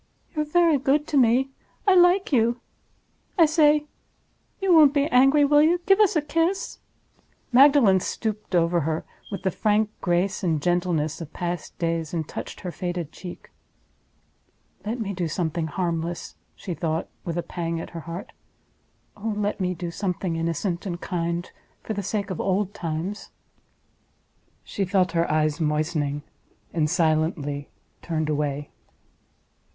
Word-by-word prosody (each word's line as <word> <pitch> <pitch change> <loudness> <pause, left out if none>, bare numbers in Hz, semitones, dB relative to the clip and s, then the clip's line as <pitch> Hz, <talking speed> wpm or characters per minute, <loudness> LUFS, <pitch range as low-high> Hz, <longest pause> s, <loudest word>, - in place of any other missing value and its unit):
You're 305 0 0
very 330 -1 +3
good 285 +3 +2
to 290 - +1
me. 255 +2 +4 0.4
I 390 - +7
like 360 +1 +5
you. 235 0 +3 0.8
I 335 - +7
say—you 305 +4 0
won't 300 -3 +7
be 285 0 +3
angry, 270 +4 +5
will 295 +1 +5
you? 335 +3 +4
Give 390 0 +5
us 420 -2 +4
a 310 - +2
kiss." 330 +5 -1 0.7
Magdalen 255 -7 +6
stooped 215 0 -3
over 170 0 +3
her 160 +1 -2 0.3
with 195 - -5
the 190 - +1
frank 210 +1 +1
grace 180 +3 0
and 165 -4 +1
gentleness 170 -2 0
of 160 -1 -7
past 175 -1 -4
days, 165 -1 -2
and 160 -2 -2
touched - - -7
her 180 - -4
faded 175 -3 -4
cheek. 180 0 -10 1.3
"Let 225 +4 -3
me 200 -3 -3
do 175 -2 -2
something 160 0 -2
harmless!" 170 0 -3 0.2
she 180 - -5
thought, 160 -1 -2 0.2
with 170 0 -4
a 175 - -1
pang 165 -1 -3
at - - -7
her 170 - -6
heart—"oh 200 +4 -9
let 210 0 -1
me 180 -1 -1
do 170 0 -5
something 180 -2 -2
innocent 170 +3 -2
and 175 -2 -4
kind 170 -1 -3 0.3
for 220 - -3
the 205 - -2
sake 200 0 -2
of 185 - -3
old 195 +1 0
times!" 175 +2 -4 1.3
She 200 - -3
felt 185 -1 +2
her 170 -1 +1
eyes 155 0 +1
moistening, 150 -1 0 0.5
and 155 -2 +1
silently 155 -4 0 0.3
turned 155 -2 -2
away. 145 -1 -2
180 Hz, 145 wpm, -25 LUFS, 165-240 Hz, 1.3 s, I